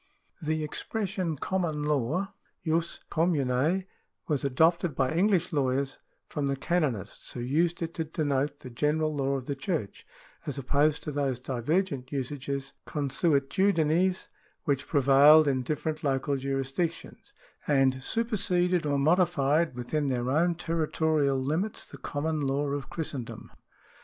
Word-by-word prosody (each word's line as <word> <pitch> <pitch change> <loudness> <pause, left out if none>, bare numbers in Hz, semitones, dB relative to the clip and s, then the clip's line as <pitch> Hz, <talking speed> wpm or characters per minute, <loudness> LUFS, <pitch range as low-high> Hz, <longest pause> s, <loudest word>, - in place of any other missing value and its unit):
The 155 0 -1
expression 185 +1 -3
common 165 -3 -1
law 150 +6 0 0.3
{jus 165 +1 0
commune) 160 +1 +1 0.4
was 145 -3 0
adopted 160 +3 +2
by 135 +2 +1
English 180 -1 +2
lawyers 135 -1 0 0.3
from 145 -2 -2
the 140 - 0
canonists, 135 - -2
who - - -6
used 165 +8 0
it 165 0 -4
to 160 - -2
denote 145 -2 -1
the 125 - -9
general 150 +5 0
law 140 -1 0
oi 135 - -2
the 135 +3 -4
Church 140 - -4 0.4
as 145 - -3
opposed 145 +3 +1
to 150 - -4
those 140 -3 -1
divergent 130 +3 -1
usages 140 0 -3
{consuetudines) 160 +5 +1 0.4
which 145 -1 -1
prevailed 145 +2 +6
in 130 -2 +1
different 155 +4 -3
local 140 0 0
jurisdictions, 135 +5 -3 0.3
and 135 -2 +3
superseded 180 - +1
or 145 -1 +1
modiiied 160 -1 +2
within 140 +4 -1
their 125 -1 -1
own 170 +4 +2
territorial 160 -4 +1
limits 160 +11 -1
the - - -12
common 155 +1 -2
law 140 0 0
of 145 -1 -4
Christendom. 140 -7 -5
150 Hz, 130 wpm, -28 LUFS, 135-165 Hz, 0.4 s, prevailed